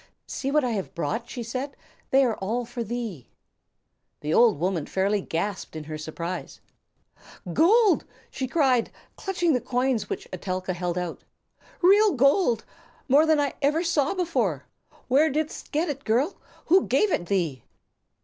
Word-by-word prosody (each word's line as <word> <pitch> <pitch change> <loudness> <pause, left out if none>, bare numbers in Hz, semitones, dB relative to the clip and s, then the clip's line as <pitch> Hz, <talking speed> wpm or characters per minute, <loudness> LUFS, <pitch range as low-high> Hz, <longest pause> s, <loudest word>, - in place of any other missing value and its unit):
"See 270 - -4
what 300 +1 +3
I 250 - 0
have 200 -4 -4
brought," 225 +9 -3
she 245 - -5
said; 260 +4 -5 0.3
"they 270 0 +5
are 230 -3 0
all 230 +5 -2
for 235 +1 -5
thee." 225 - -5 0.9
The 150 +1 -1
old 230 -3 +5
woman 175 -3 -1
fairly 200 +2 +1
gasped 185 +1 -3
in 155 - -5
her 155 0 -6
surprise. 165 +3 -5 0.9
"Gold!" 395 - +4 0.3
she 260 - -3
cried, 260 -5 +2 0.3
clutching 350 -4 0
the 250 - +1
coins 250 -3 0
which - - -5
Etelka 185 0 -3
held 175 0 -3
out. 180 -2 -4 0.6
"Real 405 +2 +6
gold! 275 - +3 0.4
More 290 +4 +5
than 315 -1 +4
I 285 -2 0
ever 300 +4 +2
saw 330 -1 +1
before. 350 -3 -1 0.4
Where 285 +5 +4
didst 305 +2 -3
get 315 +4 +1
it, 280 -2 -4
girl? 255 - +1 0.3
Who 370 +3 +4
gave 365 +10 +2
it 175 - -1
thee?" 165 - -1
245 Hz, 155 wpm, -25 LUFS, 190-300 Hz, 0.9 s, Real